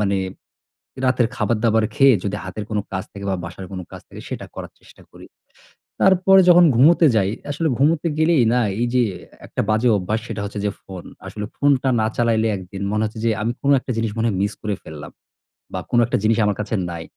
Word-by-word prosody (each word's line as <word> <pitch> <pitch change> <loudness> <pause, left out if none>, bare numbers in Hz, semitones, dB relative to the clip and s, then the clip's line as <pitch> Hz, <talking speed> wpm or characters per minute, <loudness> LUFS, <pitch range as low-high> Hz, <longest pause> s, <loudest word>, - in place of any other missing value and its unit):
মানে 100 -1 +1 0.9
রাতের 125 -2 +2
খাবার-দাবার 110 -1 +1
খেয়ে 135 -1 +6
যদি 100 0 -2
হাতের 100 +2 -6
কোনো 105 -2 -1
কাজ 95 -1 -3
থাকে 100 0 -8
বা 95 - 0
বাসার 90 +2 -8
কোনো 95 -1 -6
কাজ - - -10
থাকে - - -11
সেটা - - -5
করার - - -7
চেষ্টা - - -19
করি। - - -14 0.8
তারপরে 190 0 +5
যখন 175 0 +7
ঘুমোতে 160 +7 +5
যাই, 100 -2 +2 0.2
আসলে 160 +3 -1
ঘুমোতে 150 +4 +2
গেলেই 160 -5 +3
না 125 - +3 0.2
এইযে 120 +1 +2 0.4
একটা - - -3
বাজে 110 +3 +2
অভ্যাস 100 +4 -2
সেটা 105 - -5
হচ্ছে 105 0 -6
যে 100 - 0
ফোন। 95 -2 -10 0.2
আসলে 105 -1 -5
ফোনটা 140 -2 +2
না 110 - +1
চালাইলে 115 -2 +2
একদিন 95 +1 -9
মনে 105 +1 0
হচ্ছে 110 +1 -6
যে 115 - +3
আমি 115 +2 0
কোনো 140 0 +3
একটা 130 - -6
জিনিস 115 -2 -1
মনে 115 +1 +1
হয় 100 -4 -1
মিস 100 +1 -1
করে 105 -1 -2
ফেললাম, 75 -2 -9 0.6
বা - - -2
কোনো 120 -1 +3
একটা 120 - 0
জিনিস 110 +1 +2
আমার 105 -2 +1
কাছে 105 +2 -3
নাই। 85 -1 -6
110 Hz, 205 wpm, -21 LUFS, 100-130 Hz, 0.9 s, যখন